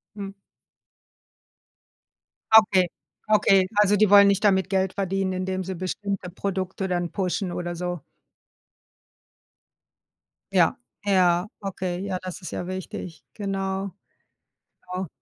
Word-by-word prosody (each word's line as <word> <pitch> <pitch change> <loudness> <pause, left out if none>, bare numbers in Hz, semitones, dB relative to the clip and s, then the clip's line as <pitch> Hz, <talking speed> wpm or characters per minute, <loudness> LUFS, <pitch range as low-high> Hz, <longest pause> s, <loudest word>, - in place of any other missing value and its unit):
Hm. 200 -1 -6 2.2
Okay, 200 -5 +6 0.4
okay. 195 -3 +5 0.2
Also, 205 0 +4
die 210 -1 +4
wollen 200 0 +8
nicht 200 +1 +2
damit 190 -3 +3
Geld 190 -1 +1
verdienen, 195 -1 -1
indem 185 0 -2
sie 190 +1 -5
bestimmte 185 +1 -4
Produkte 190 0 -3
dann 175 -1 -1
pushen 185 -1 -2
oder 175 0 -4
so? 175 -3 -4 2.5
Ja, 170 -3 +4 0.3
ja, 180 -2 +3
okay, 185 -2 -3
ja, 185 -2 -2
das 185 +2 -7
ist - - -6
ja 175 - -4
wichtig. 185 -2 -7
Genau. 195 -1 -3 1.0
Genau. 185 0 -3
190 Hz, 110 wpm, -25 LUFS, 180-200 Hz, 2.5 s, wollen